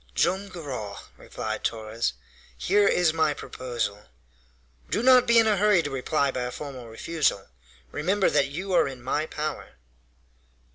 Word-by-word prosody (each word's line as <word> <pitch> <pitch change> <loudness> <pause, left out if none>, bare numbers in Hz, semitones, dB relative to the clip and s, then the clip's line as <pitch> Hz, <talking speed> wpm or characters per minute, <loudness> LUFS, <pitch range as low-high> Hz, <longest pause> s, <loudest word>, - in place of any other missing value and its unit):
"Joam 190 +3 +1
Garral," 130 - -6 0.2
replied - - -5
Torres, 110 - -2 0.4
"here 205 +2 +3
is 175 -3 +3
my 155 -2 +2
proposal. 115 -7 -4 0.8
Do 220 - 0
not 255 -1 +6
be 235 0 +5
in 225 - +6
a 215 -2 +3
hurry 205 -3 +4
to 145 - -4
reply 140 +1 0
by 130 - -3
a - - -3
formal 130 -4 -7
refusal. 115 -3 -1 0.4
Remember 190 +6 +1
that - - +3
you 185 +7 -4
are - - +4
in 130 -3 -8
my 150 +4 -1
power." 155 0 -5
150 Hz, 150 wpm, -26 LUFS, 125-190 Hz, 0.8 s, not